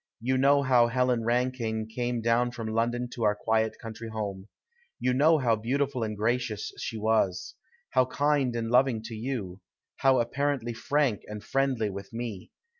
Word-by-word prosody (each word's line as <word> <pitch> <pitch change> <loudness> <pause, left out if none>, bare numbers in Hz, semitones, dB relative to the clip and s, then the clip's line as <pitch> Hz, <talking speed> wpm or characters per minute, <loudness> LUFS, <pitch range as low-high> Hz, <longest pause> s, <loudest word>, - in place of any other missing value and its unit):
You 130 +3 0
know 140 +2 +4
how 125 -3 +5
Helen 125 -1 +1
Rankine 120 -2 0
came 120 +1 -2
down 115 +2 +2
from 115 -3 -5
London 120 +2 0
to 120 - -8
our 105 -1 +3
quiet 110 +1 0
country 115 0 -8
home. 100 -3 -5 0.5
You 125 - +1
know 155 +5 +5
how 120 -5 +2
beautiful 130 +4 -1
and 110 -2 -2
gracious 110 -1 -1
she 115 - -4
was. 110 -4 0 0.4
How 130 0 +4
kind 140 -3 +1
and 115 -1 -2
loving 125 -3 +3
to 115 - -7
you; 110 -5 -4 0.4
how 135 -1 +4
apparently 130 0 -1
frank 130 -1 0
and 105 -1 -7
friendly 130 -6 0
with 100 +2 -8
me. 115 -5 -5
120 Hz, 165 wpm, -28 LUFS, 110-130 Hz, 0.5 s, how